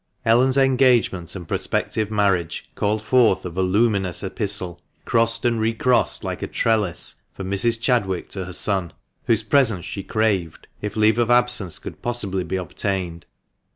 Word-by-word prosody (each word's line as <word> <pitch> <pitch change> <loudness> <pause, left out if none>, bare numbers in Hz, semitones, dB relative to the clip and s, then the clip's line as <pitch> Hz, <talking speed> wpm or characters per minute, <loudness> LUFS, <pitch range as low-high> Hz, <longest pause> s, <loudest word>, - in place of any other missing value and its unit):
Ellen's 125 +4 +3
engagement 125 -10 +2
and 90 -4 -8
prospective 110 -1 -1
marriage 100 -6 -1
called 105 +1 -1
forth 115 -6 +3
a 90 - -4
voluminous 95 +1 +1
epistle, 95 -3 -1 0.2
crossed 115 +1 +1
and 115 -2 +1
recrossed 115 +3 +1
like - - -4
a - - -3
trellis, 110 -6 -1
from 95 0 -6
Mrs. 115 +3 +3
Chadwick 115 -7 0
to 95 -2 -5
her 90 - -8
son, 95 -2 -1 0.3
whose 115 -1 +2
presence 115 -7 +2
she 100 - -5
craved, 95 -6 -1 0.2
if 105 - -5
leave 110 +1 +3
of 120 -1 +1
absence 120 -8 +4
could - - -9
possibly 100 -6 -1
be 95 - -4
obtained. 90 -1 -4
105 Hz, 150 wpm, -22 LUFS, 95-115 Hz, 0.3 s, absence